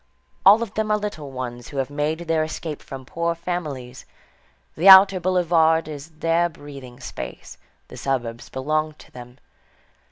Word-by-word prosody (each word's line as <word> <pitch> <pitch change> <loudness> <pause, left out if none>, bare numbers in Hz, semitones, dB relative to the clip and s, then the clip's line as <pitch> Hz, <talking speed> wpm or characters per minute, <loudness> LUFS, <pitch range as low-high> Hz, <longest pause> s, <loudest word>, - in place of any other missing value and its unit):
All 210 +4 +7
of 215 -3 -8
them 220 0 -1
are 210 - +3
little 205 -9 -5
ones 120 -2 -6
who 140 - -9
have 135 +1 -2
made 150 +3 -2
their 165 -2 0
escape 155 -1 -5
from 135 -1 -9
poor 170 +4 -2
families. 150 -8 -5 0.7
The 180 +5 +5
outer 190 0 +9
boulevard 165 -3 +2
is 150 0 -8
their 165 +2 0
breathing 140 -5 -12
space; - - -8 0.3
the - - -12
suburbs 120 -3 -3
belong 155 +3 -1
to - - -18
them. 125 0 -12
155 Hz, 155 wpm, -23 LUFS, 135-170 Hz, 0.7 s, outer